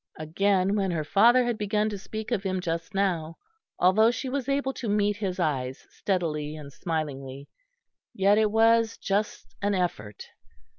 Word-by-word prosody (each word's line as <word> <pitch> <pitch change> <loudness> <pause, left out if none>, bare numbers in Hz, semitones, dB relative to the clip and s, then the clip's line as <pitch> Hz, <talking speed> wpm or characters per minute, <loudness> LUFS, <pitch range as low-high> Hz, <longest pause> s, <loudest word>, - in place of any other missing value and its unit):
Again 190 +5 +1
when 195 -2 0
her 165 -3 -1
father 235 +10 +4
had 240 -2 -2
begun 210 +1 0
to 205 - -5
speak 220 +4 -7
of 225 -5 +1
him 185 -1 -2
just 170 0 -4
now, 170 -5 -1 0.4
although 190 +5 +5
she 255 +2 -3
was 270 0 -3
able 275 -1 0
to 235 - -5
meet 205 0 +1
his 190 -3 -3
eyes 135 -6 -2
steadily 155 -6 -2
and 145 -3 -10
smilingly, 140 -4 -4 0.6
yet 200 +2 +3
it 215 -1 +3
was 225 +1 +3
just 205 +1 -2
an 205 0 +1
effort. 105 - -3
195 Hz, 160 wpm, -26 LUFS, 160-215 Hz, 0.6 s, although